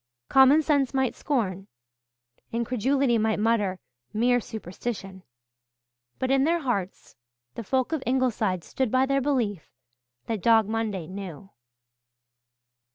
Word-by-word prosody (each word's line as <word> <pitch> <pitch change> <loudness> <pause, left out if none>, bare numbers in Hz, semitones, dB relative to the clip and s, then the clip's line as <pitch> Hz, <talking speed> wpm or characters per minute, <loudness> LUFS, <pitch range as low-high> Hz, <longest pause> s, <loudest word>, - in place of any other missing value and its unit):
Common 270 +4 +6
sense 280 -3 +1
might 265 -2 +1
scorn 195 -9 -2 0.8
incredulity 240 +2 +1
might 220 0 +1
mutter 210 -3 +1 0.4
"Mere 245 +3 +3
superstition" 195 -2 -6 1.0
but 260 0 -1
in 270 0 +4
their 335 +3 +1
hearts 195 - -3 0.4
the 230 - -6
folk 260 +5 0
of 320 -4 -1
Ingleside 230 -8 0
stood 260 -3 -2
by 260 +3 +3
their 275 0 +1
belief 235 - -1 0.6
that 220 -4 -3
Dog 225 -1 +4
Monday 215 -5 -2
knew. 190 0 -8
230 Hz, 115 wpm, -26 LUFS, 200-265 Hz, 1.0 s, Common